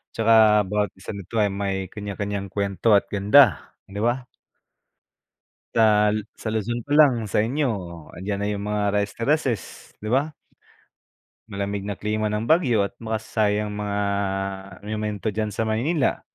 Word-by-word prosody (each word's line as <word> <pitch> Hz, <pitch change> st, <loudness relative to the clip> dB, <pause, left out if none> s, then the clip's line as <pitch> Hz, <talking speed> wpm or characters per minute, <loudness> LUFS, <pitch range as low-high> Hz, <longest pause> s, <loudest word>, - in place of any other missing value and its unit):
tsaka 110 Hz, -2 st, +5 dB
bawat 105 Hz, +2 st, 0 dB
isa 95 Hz, -, -8 dB
nito 100 Hz, +2 st, -8 dB
ay 105 Hz, -2 st, +2 dB
may 95 Hz, -1 st, -3 dB
kanya-kanyang 100 Hz, -1 st, -4 dB
kwento 100 Hz, +2 st, +1 dB
at 100 Hz, -, +4 dB
ganda, 105 Hz, -, +4 dB
di 100 Hz, +1 st, -8 dB
ba? 120 Hz, +4 st, 0 dB, 1.5 s
Sa 105 Hz, -2 st, +4 dB
Lu 105 Hz, -, 0 dB, 0.2 s
sa 110 Hz, -, -5 dB
Luzon 115 Hz, +2 st, -2 dB
pa 145 Hz, -, -20 dB
lang 120 Hz, -8 st, +4 dB
sa -, -, +1 dB
inyo, 140 Hz, +2 st, 0 dB, 0.5 s
andiyan 100 Hz, +2 st, -3 dB
na 105 Hz, -, 0 dB
yung 100 Hz, 0 st, -3 dB
mga 105 Hz, -1 st, 0 dB
rice 100 Hz, 0 st, -1 dB
terracess, 130 Hz, -2 st, -2 dB
di 110 Hz, -, -4 dB
ba? 145 Hz, +5 st, +1 dB, 1.1 s
Malamig 100 Hz, -1 st, -3 dB
na 100 Hz, -, -3 dB
klima 105 Hz, +1 st, -1 dB
ng 105 Hz, +1 st, -2 dB
Baguio 125 Hz, -, +3 dB
at 100 Hz, -, -5 dB
makasaysayang 105 Hz, -2 st, -1 dB
mga 105 Hz, -1 st, -3 dB, 0.9 s
monumento 105 Hz, 0 st, -3 dB
diyan 110 Hz, +1 st, -2 dB
sa 110 Hz, -, -1 dB
Maynila 125 Hz, +8 st, 0 dB
105 Hz, 145 wpm, -24 LUFS, 100-115 Hz, 1.5 s, tsaka